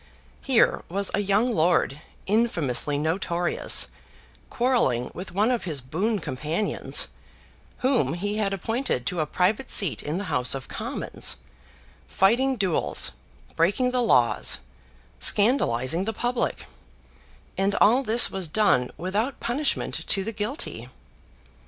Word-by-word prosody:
Here 255 -4 +2
was 195 +3 -1
a - - +1
young 205 +5 +1
lord, 160 -5 +1 0.2
infamously 165 - 0
notorious, 170 +3 +1 0.6
quarrelling 235 - 0
with 185 - -8
one 210 +6 +1
of 240 -5 -2
his 155 -6 -1
boon 185 - -2
companions, 155 +5 0 0.8
whom 260 -10 +2
he 205 +4 -3
had 205 -2 0
appointed 210 - -2
to 180 - -2
a 155 - 0
private 205 - 0
seat 190 -8 +2
in 150 +3 -3
the 200 - -3
House 125 -9 0
of 135 - -7
Commons, - - -4 0.7
fighting 245 +7 +2
duels, 190 -7 +1 0.4
breaking 200 +10 +1
the 250 0 +1
laws, 125 - +2 0.6
scandalising 180 - +2
the 225 - -2
public, 240 +3 -2 0.9
and 195 +1 0
all 240 +6 +4
this 235 -2 +4
was 190 -3 -1
done 155 -9 +2
without 205 - -2
punishment 275 +5 -2
to 195 - +1
the 225 - -4
guilty! 215 +9 -4
195 Hz, 125 wpm, -25 LUFS, 160-230 Hz, 0.9 s, all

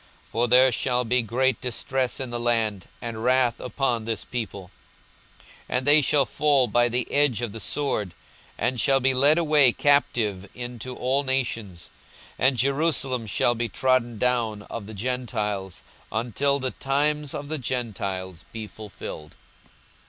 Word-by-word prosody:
for 120 +3 +1
there 125 +2 +6
shall 125 +1 0
be 125 +2 +2
great 125 +2 0
distress 125 +1 -2
in 130 -2 -4
the 120 - -3
land, 115 -5 0 0.2
and 115 -1 -5
wrath 125 -1 +2
upon 125 -2 -1
this 115 0 -3
people. 100 -6 -5 1.0
42:021:024 - - +1
And 130 - -2
they 145 +1 +7
shall 140 0 +3
fall 145 -4 +2
by 120 0 +2
the 125 +1 -1
edge 140 -5 +2
of 120 - -2
the 115 - -7
sword, 105 -10 -2 0.4
and 125 0 -1
shall 135 -1 +3
be 130 0 +2
led 140 +5 +5
away 150 -6 +5
captive 110 -9 +1
into 125 0 -6
all 130 +3 +1
nations: 115 -9 -2 0.5
and 130 0 +3
Jerusalem 135 -3 0
shall 120 +4 +2
be 120 0 -2
trodden 125 0 +1
down 115 -3 0
of 105 -2 -7
the 110 - -9
Gentiles, 105 -5 -3 0.3
until 125 +5 0
the 130 -2 -3
times 145 +1 0
of 145 - -5
the 155 0 -3
Gentiles 100 -8 -4
be 110 -1 -5
fulfilled. 100 -7 -9
125 Hz, 150 wpm, -25 LUFS, 110-135 Hz, 1.0 s, they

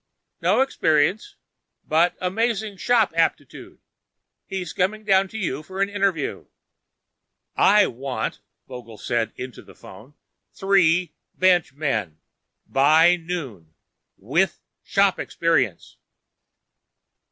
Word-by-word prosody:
"No - - +3
experience, 185 - +1 0.5
but 165 +3 +2
amazing 215 +2 -2
shop 225 -4 +2
aptitude. 165 0 -2 0.7
He's 185 -3 -5
coming 215 +4 -1
down 195 -2 +3
to 220 - -9
you 155 -9 -3
for 190 +5 -9
an 200 0 +1
interview." 195 -7 -2 1.1
"I 205 0 +5
want," 130 +2 -4 0.3
Vogel 120 -4 -10
said 115 +1 -2
into 125 -1 -8
the - - -17
phone, 110 +10 -15 0.4
"three 180 -3 +2 0.2
bench 180 -6 +2
men. 110 - -3 0.5
By 155 +6 +4
noon. 135 - -7 0.4
With - - 0 0.2
shop 195 -1 +1
experience." 140 - -1
170 Hz, 100 wpm, -23 LUFS, 135-195 Hz, 1.1 s, I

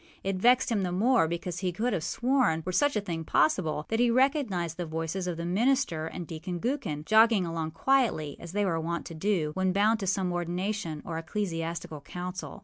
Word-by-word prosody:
It 195 -1 -1
vexed 245 +5 +4
him 215 -3 +1
the 180 -2 -1
more, 220 +1 +3
because 170 +1 -4
he 185 -1 -1
could 225 +7 -1
have 170 -5 -1
sworn, 235 - +1
were 185 - -2
such 285 +10 +2
a 210 - +1
thing 170 -5 -4
possible, 155 -1 +1
that 225 - 0
he 240 0 +4
recognized 235 - +1
the 175 - -3
voices 165 +4 -3
of 175 -2 -3
the 170 - -4
minister 195 - +1
and 175 +1 -6
Deacon 170 +2 -5
Gookin, 195 - -2
jogging 220 -2 +5
along 165 -1 -3
quietly, 210 - +1
as 170 0 -9
they 205 0 +1
were 165 -4 0
wont 170 +1 -3
to 170 - -7
do, 165 -2 0
when 190 +1 +1
bound 215 +3 +3
to 195 - -3
some 185 -1 0
ordination 175 -1 -3
or 165 -2 -3
ecclesiastical 165 -4 -4
council. 180 +5 -6
180 Hz, 205 wpm, -28 LUFS, 165-215 Hz, -, jogging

